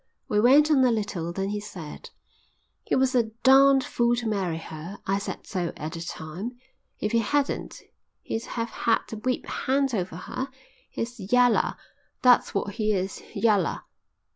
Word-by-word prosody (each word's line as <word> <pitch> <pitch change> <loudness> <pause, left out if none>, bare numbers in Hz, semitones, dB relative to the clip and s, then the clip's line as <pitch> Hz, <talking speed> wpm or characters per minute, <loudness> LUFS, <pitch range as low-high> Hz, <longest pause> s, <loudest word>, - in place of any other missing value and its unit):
We 210 - +1
went 280 +7 +6
on 270 -3 +5
a 255 - +5
little. 205 -7 -2
Then 195 +2 -2
he 210 0 -2
said: 180 -7 -9 0.8
"He - - +1
was 260 0 +2
a 240 -3 +3 0.2
darned 270 0 +7
fool 240 -1 +1
to 240 -1 -3
marry 190 -6 -1
her. 165 +4 -8
I 195 +1 +1
said 200 - -6
so 180 -4 -2
at 155 +1 -5
the 165 - -6
time. 175 +9 -6 0.4
If 210 - -1
he 230 - +3
hadn't, 280 +6 -1 0.4
he'd 225 - -3
have 230 -1 -4
had 225 -1 +1
the 220 - -6
whip 255 +4 -2
hand 270 0 0
over 185 -5 -2
her. 255 +9 -5 0.4
He's 230 -4 -6
yaller, 245 -1 +4 0.5
that's 250 -4 +5
what 200 +1 -1
he 215 -2 +1
is, 190 0 -2
yaller." 205 -7 +2
215 Hz, 165 wpm, -26 LUFS, 190-250 Hz, 0.8 s, darned